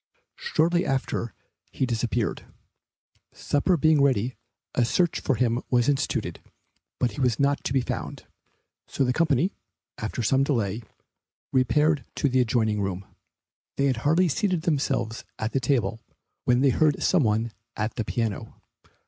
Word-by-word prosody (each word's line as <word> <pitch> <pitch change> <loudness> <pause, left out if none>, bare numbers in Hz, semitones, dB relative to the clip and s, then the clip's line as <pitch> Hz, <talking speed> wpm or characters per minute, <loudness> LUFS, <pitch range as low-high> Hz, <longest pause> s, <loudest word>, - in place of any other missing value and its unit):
Shortly 175 - +1
after 130 - -2 0.4
he 130 - -1
disappeared. 120 -2 -2 0.9
Supper 170 +5 +1
being 155 -1 +4
ready 130 -3 +2 0.4
a 125 - +2
search 170 +8 +1
for 135 - 0
him 120 +1 +1
was 120 -2 +2
instituted, 145 -2 -1 0.6
but 125 - +1
he 140 - -6
was 125 -3 +1
not 140 0 +1
to - - -1
be 135 -1 +2
found, - - -5 0.6
so - - -1
the 125 -1 +1
company, 160 +3 +2 0.5
after 110 +2 -3
some 135 +5 +3
delay, 115 -6 -1 0.7
repaired 150 +3 +3
to - - +1
the 130 0 +2
adjoining 110 -3 +1
room. 95 -1 -3 0.7
They 140 - +2
had 130 -3 +1
hardly 160 +9 +3
seated 180 +1 0
themselves 140 -8 -1
at 110 +1 -2
the 135 - +1
table, 120 -4 0 0.4
when 125 +1 +3
they 140 - +5
heard 150 +2 +2
some 185 - +3
one 110 -1 +1 0.3
at 110 +1 -1
the 115 - -2
piano. 110 0 -3
130 Hz, 150 wpm, -26 LUFS, 115-145 Hz, 0.9 s, they